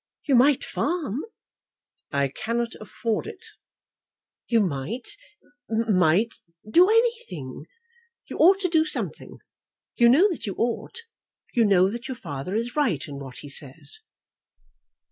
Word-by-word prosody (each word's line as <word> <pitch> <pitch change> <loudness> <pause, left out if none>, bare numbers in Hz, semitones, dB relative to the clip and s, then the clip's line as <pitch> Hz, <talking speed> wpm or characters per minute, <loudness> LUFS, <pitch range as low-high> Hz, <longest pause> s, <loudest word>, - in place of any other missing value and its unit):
"You 285 - +1
might 260 +3 +5
farm." 295 - -2 0.9
"I 140 -1 +1
cannot 230 - -2
afford 220 - -3
it." 435 -4 -9 1.0
"You 230 - +3
might, 205 - -2 0.5
might 215 -2 +2 0.3
do 350 - +6
anything. 430 - 0 0.6
You - - -7
ought 380 +4 +6
to 370 - +2
do 325 -2 +3
something. 360 - -3 0.6
You 235 -1 +6
know 315 +11 +6
that 320 - -5
you 195 - -3
ought. 240 - -2 0.5
You 235 -3 +4
know 190 -2 +5
that 235 +2 -6
your 260 - -5
father 160 - -5
is 235 +2 -2
right 240 - +1
in 140 -1 -7
what 135 -3 -9
he - - -8
says." 140 +1 -4
230 Hz, 130 wpm, -25 LUFS, -, 1.0 s, do